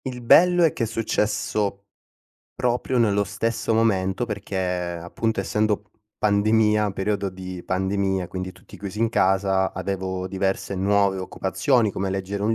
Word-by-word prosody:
Il 125 -2 -5
bello 175 +8 +6
è 160 - +4
che - - -2
è - - +2
successo 105 -2 -1 0.7
proprio 125 +1 0
nello 105 -4 +3
stesso 115 +3 -1
momento, 105 -1 +1
perché 100 -3 -5
appunto, 90 +3 -2
essendo 105 +1 0
p 100 - -36 0.3
pandemia 105 0 +3
periodo 100 +1 -1
di 95 -1 -8
pandemia, 95 0 -1
quindi 95 0 -5
tutti - - -15
chiusi 100 +1 -6
in 115 0 +2
casa, 95 -2 +2
avevo 95 0 -3
diverse 95 +1 -2
nuove 100 0 +2
occupazioni, 105 +5 +1
come 95 +1 -2
leggere 95 +1 -3
un 110 +1 +2
100 Hz, 145 wpm, -24 LUFS, 95-110 Hz, 0.7 s, bello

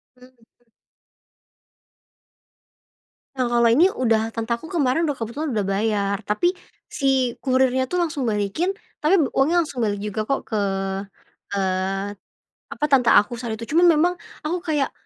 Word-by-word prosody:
Mhm. 250 -1 -23 2.7
Nah, 250 -2 -1
kalau 235 -1 +4
ini 320 +12 +5
udah 225 - +1
tante 230 +1 -2
ku 320 - -9
kemarin 315 -1 +1
udah 290 -4 -1
kebetulan 265 +7 -3
udah 210 -4 -1
bayar, 200 0 0
tapi 350 - 0 0.3
si 265 -3 0
kurirnya 260 -1 +2
itu 360 +7 -2
langsung 320 -5 -1
balikin 220 - 0 0.3
tapi 355 +5 +4 0.2
uangnya 295 +6 +3
langsung 265 -7 -3
balik 205 -2 -1
juga 210 +1 -3
kok 275 +5 -1
ke, 220 - -4 1.0
eee, 195 +1 -1 0.5
apa, 300 - -4
tante 250 -3 +5
aku 210 +4 +5
saat 225 -3 -4
itu 230 - -7
cuman 345 +2 +5
memang 350 +4 +2 0.3
aku 340 +4 -1
kayak 295 -3 0
250 Hz, 140 wpm, -22 LUFS, 215-300 Hz, 2.7 s, ini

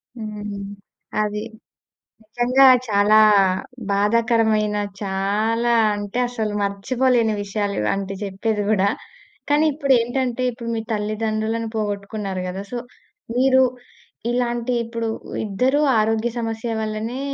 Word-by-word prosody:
హ్మ్. 210 -3 -6 0.6
అది. 210 0 -3 0.8
నిజంగా 245 +5 +3 0.2
చాలా 205 +1 +4 0.7
బాధాకరమైన 215 0 +2 0.3
చాలా 210 +5 0 0.2
అంటే, 205 +3 -4
అసలు 220 -3 -3
మర్చిపోలేని 230 +3 +1
విషయాలు 205 0 -2
ఇవాంటివి 195 - -2
చెప్పేది 205 +2 -2
కూడా. 200 -2 +3 0.6
కానీ, 295 +2 +4
ఇప్పుడు 275 -2 +2
ఏంటంటే 245 +1 -1
ఇప్పుడు 235 0 -7
మీ 225 - -2
తల్లిదండ్రులను 215 +1 -1
పోగొట్టుకున్నారు 205 -2 -3
కదా! 190 +2 -5
సో, 245 - -3 0.6
మీరు 260 +1 +4 0.7
ఇలాంటి 240 0 -1
ఇప్పుడు 230 0 -4 0.4
ఇద్దరూ 250 +8 +1 0.2
ఆరోగ్య 220 +2 +1
సమస్య 225 0 -3
వల్లనే 220 +3 -3
220 Hz, 100 wpm, -22 LUFS, 205-240 Hz, 0.8 s, చాలా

